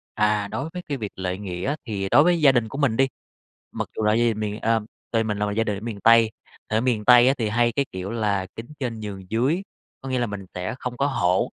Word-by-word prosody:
À, 105 -1 +2
đối 135 +9 -4
với 180 - -5
cái 145 -5 -4
việc 105 -5 -5
lễ 90 -1 -3
nghĩa 100 +7 -3
thì 100 -4 -3
đối 145 - +7
với 175 -1 +3
gia 140 - +7
đình 120 -4 +1
của 135 - -7
mình 135 -6 +1
đi, 135 - +4 0.7
mặc - - -3
dù 110 - -2
là 105 0 +3
gia 120 +1 +3
đình 110 -2 +1
mình, 105 0 -3
ờ 115 0 +2 0.3
gia 115 - +2
đình 110 - +1
mình 105 -1 -1
là 105 - 0
một 105 - -2
gia 115 +2 +1
đình 105 -2 -1
ở - - -8
miền 110 -2 -6
Tây. 115 +1 +6 0.4
Ở 110 +1 +1
miền 115 -4 0
Tây 125 +1 +7
á 135 - +3
thì 110 - 0
hay, 120 +2 +2
cái 140 +4 +1
kiểu 95 +2 -5
là, 105 -4 0
kính 115 +1 -7
trên 120 -4 -3
nhường 100 -3 -7
dưới, 135 +11 +1 0.4
có 135 - -7
nghĩa 130 -1 0
là 120 - +1
mình 100 -3 -6
sẽ 90 +6 -3
không 125 -1 -4
có 140 +3 +1
hỗn, 95 -9 +1
110 Hz, 275 wpm, -24 LUFS, 105-125 Hz, 0.7 s, đối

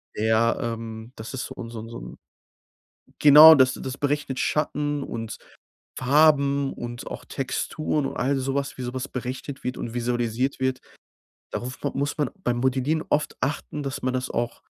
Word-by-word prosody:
ja, 115 +2 +1
ähm, 115 0 -8
das 110 +4 -7
ist 120 - -3
so - - -8
'n 115 - -7
so 115 -1 -7
'n 110 +1 -8
so 115 - -7
'n - - -10 1.0
Genau, 150 +2 +11
das 130 -2 +4
das 130 +1 -6
berechnet 145 -2 -1
Schatten 145 -1 0
und 115 -1 -5 0.6
Farben 140 0 +4
und 120 0 -7
auch - - -7
Texturen 145 +2 -2
und - - -4
all 135 +3 +1
sowas 135 +1 -2
wie 130 - -5
sowas 125 +2 -4
berechnet 130 +2 -6
wird 125 0 -3
und 115 - -5
visualisiert 120 +2 -1
wird, 130 0 -1 0.7
darauf 125 +2 -4
m - - 0
muss 140 +2 -2
man 150 - 0
beim 120 -1 0
Modellieren 130 +5 +1
oft 150 0 0
achten, 145 +1 -3
dass 135 - -4
man 130 0 -1
das 130 0 -2
auch 120 0 -3
130 Hz, 170 wpm, -25 LUFS, 120-140 Hz, 1.0 s, Genau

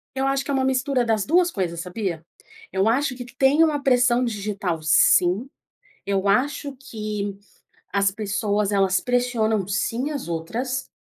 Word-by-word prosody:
Eu 265 0 0
acho 275 0 0
que - - -10
é - - 0
uma 265 -1 +1
mistura 260 -1 +1
das 220 -3 +1
duas 350 +1 +3
coisas, 170 -4 -3
sabia? 180 -3 -4 0.5
Eu 190 +3 +1
acho 260 +3 +1
que 245 - -7
tem 270 +5 +3
uma 290 -3 -1
pressão 250 -1 +3
digital 205 -6 -2
sim, 180 - +3 0.6
eu 195 0 0
acho 275 +6 +1
que 210 -5 -5 0.5
as 200 -1 +2
pessoas 205 0 -1
elas 195 -1 +3
pressionam 230 -5 0
sim 230 +8 -1
as 285 - -4
outras, 240 +11 -3
220 Hz, 150 wpm, -23 LUFS, 195-260 Hz, 0.6 s, duas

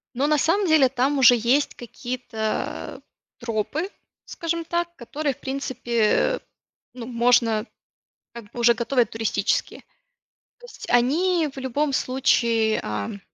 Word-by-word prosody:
Но 280 +4 +1
на 300 0 +3
самом 365 +7 +2
деле 300 -5 +5
там 270 +2 0
уже 250 -1 +8
есть 245 +6 +1
какие-то 240 -2 -5 0.4
тропы, 235 - -2 0.4
скажем 335 0 -4
так, 345 0 -2
которые 285 +4 -3
в - - -24
принципе, 260 - 0 0.6
ну, 235 -2 -7
можно 235 -2 +2 0.7
как 235 -2 -9
бы 240 - -8
уже 235 0 +5
готовые 240 +1 +1
туристические. 220 -2 -2 0.8
То - - -19
есть - - -11
они 315 +7 +2
в - - -9
любом 275 +3 -1
случае 235 -4 +1
ам, 105 - -4
255 Hz, 125 wpm, -23 LUFS, 235-295 Hz, 0.8 s, уже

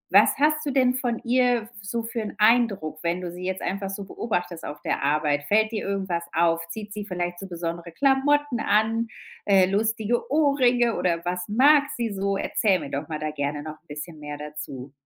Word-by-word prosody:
Was - - +6
hast 305 +1 +2
du 290 - -2
denn 255 -2 +3
von 245 -3 -1
ihr 245 -1 +2
f 225 - -14
so 225 +3 -3
für 230 0 -3
'n 210 - -6
Eindruck, 210 -9 +3
wenn 170 +1 -1
du 175 -2 -5
sie 180 +1 -9
jetzt 190 0 -3
einfach 195 +1 -2
so 195 0 -5
beobachtest 180 -6 -3
auf 150 0 -6
der - - -1
Arbeit? 145 0 +1
Fällt 215 +4 +3
dir 215 - -3
irgendwas 190 -4 -2
auf? 165 0 +2
Zieht 210 +2 -7
sie 210 -1 -4
vielleicht 175 -2 -3
so 195 - -7
besondere 170 -1 -5
Klamotten 275 - +2
an, 220 +2 +2 0.4
äh, 195 -2 +5
lustige 220 +5 0
Ohrringe 255 -6 +3
oder 170 -1 0
was 180 0 -2
mag 285 +6 +5
sie 230 -3 -2
so? 195 0 -1
Erzähl 195 -2 +2
mir 140 - -7
doch 145 +2 -3
mal 155 - -3
da 155 0 -3
gerne 145 0 -3
noch 155 0 -8
bisschen 150 +2 -8
mehr 150 0 -6
dazu. 150 -3 -7
195 Hz, 200 wpm, -25 LUFS, 170-235 Hz, 0.4 s, Was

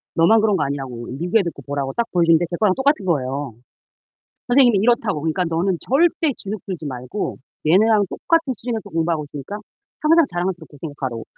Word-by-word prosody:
너만 175 +7 +5
그런 210 -2 +2
거 - - 0
아니라고 135 -4 -5
이 130 - -6
미국 180 +6 +2
애들 175 -5 +1
거 - - -12
보라고 140 -1 -3
딱 235 -1 -1
보여주는데 170 -1 +3
제 175 - -3
거랑 210 -4 +3
똑같은 265 -7 +1
거예요. 140 -5 -1 0.9
선생님이 245 -4 +5
이렇다고, 215 -7 +1
그러니까 160 +3 0
너는 170 +2 0
절대 315 +2 +2
주눅 205 -1 -5
들지 175 -5 -5
말고 130 +8 -4 0.3
얘네랑 205 +5 +4
똑같은 325 -6 0
수준에서 225 -3 -4
공부하고 165 -3 -1
있으니까 145 +7 -7 0.4
항상 325 +1 +5
자랑스럽게 175 -4 -4
생각하라고. 130 -7 -5
175 Hz, 450 characters per minute, -21 LUFS, 145-220 Hz, 0.9 s, 너만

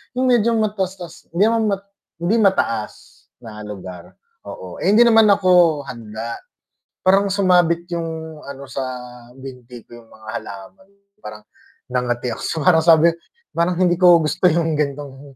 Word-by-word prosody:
yung 255 +1 +1
medyo 235 -1 +3
mataas-taas 190 -5 -3
hindi 175 +4 +2
naman 230 -1 +1
mat 195 0 -5 0.4
hindi 195 +7 +1
mataas 115 - -1 0.2
na 110 -3 -10
lugar, 95 -4 -10 0.3
oo, - - -9
eh, - - -2
hindi 225 - +6
naman 225 -2 +5
ako 180 -6 +4
handa 115 0 -7 0.7
parang 195 +2 +3
sumabit 180 -4 +2
yung 160 -2 -5
ano 140 0 -8
sa 135 0 -6 0.5
binti 125 -3 -11
ko, - - -31
yung 115 - -19
mga 110 -1 -18
halaman. 95 - -12 0.3
Parang 105 - -10 0.5
nangati 125 -1 -2
ako, - - -7
so - - -3
parang 180 -3 +5
sabi 165 0 +5 0.4
parang 170 +2 0
hindi 175 0 +1
ko 175 -3 +6
gusto 155 +4 +1
yung 165 -2 0
gan'tong 140 -1 -5
165 Hz, 150 wpm, -20 LUFS, 125-185 Hz, 0.7 s, hindi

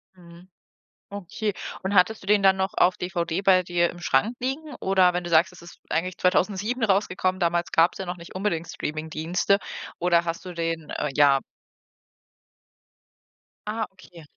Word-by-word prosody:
Mhm. 175 0 -16 0.6
Okay. 205 +2 -4 0.3
Und 195 +2 -1
hattest 195 +4 +3
du 190 - -14
den 205 -1 +4
dann 190 0 +6
noch 190 +2 -1
auf 180 - +4
DVD 175 -1 -2
bei 185 -2 +4
dir 175 -1 +1
im 175 - -10
Schrank 175 - +1
liegen 270 +3 -4
oder 190 -2 +4
wenn 180 0 -2
du 175 - -5
sagst, 165 +3 +4
das 180 -1 -15
ist 170 - -14
eigentlich 175 +3 -1
2007 205 +6 +1
rausgekommen, 185 -2 +1
damals 175 -1 0
gab's 165 +2 +3
ja 190 - -5
noch 180 0 -5
nicht 170 +1 -12
unbedingt 175 -4 -2
Streamingdienste 160 +5 -1 0.4
oder 170 -1 +2
hast 165 +1 -4
du 180 - -7
den, 165 -2 -3
äh, - - -2
ja 140 -2 +5 2.3
Ah, 220 +1 -2
okay. 180 -3 -15
180 Hz, 165 wpm, -25 LUFS, 170-195 Hz, 2.3 s, dann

